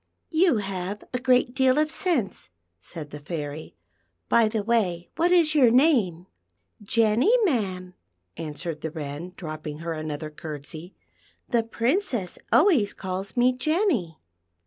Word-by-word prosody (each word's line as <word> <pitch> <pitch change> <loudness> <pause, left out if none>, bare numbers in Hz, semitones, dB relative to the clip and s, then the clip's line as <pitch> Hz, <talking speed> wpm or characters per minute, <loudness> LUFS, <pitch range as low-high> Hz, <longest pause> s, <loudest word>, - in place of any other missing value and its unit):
"You 330 -5 +4
have 195 0 -4
a 250 - 0
great 250 -1 +3
deal 260 0 +3
of 305 0 +2
sense," 315 - -1 0.3
said 150 - -8
the 150 - -7
Fairy. 150 0 -6 0.3
" 85 0 -49
B} 230 -2 +5
the 215 -1 -2
way, 190 -7 0
what 340 +2 +2
is 340 -3 +5
x 295 - +4
our 245 - +7
name. 230 - +3 0.2
'" 90 +2 -50
" - - -51
Jenny, 225 - +3
ma'am," 190 - -1 0.4
answered 155 0 -5
the 160 - -3
Wren, 155 +3 -6
dropping 155 -3 -6
her 165 +1 -4
another 155 -1 -5
curtsey. 155 +3 -8 0.3
" - - -36
The 235 -2 +3
Princess 235 - -1
alwa\ 355 - +5
s 205 - -3
calls 190 +3 -5
me 250 +1 +4
Jenny." 270 - 0
195 Hz, 155 wpm, -25 LUFS, 160-255 Hz, 0.4 s, our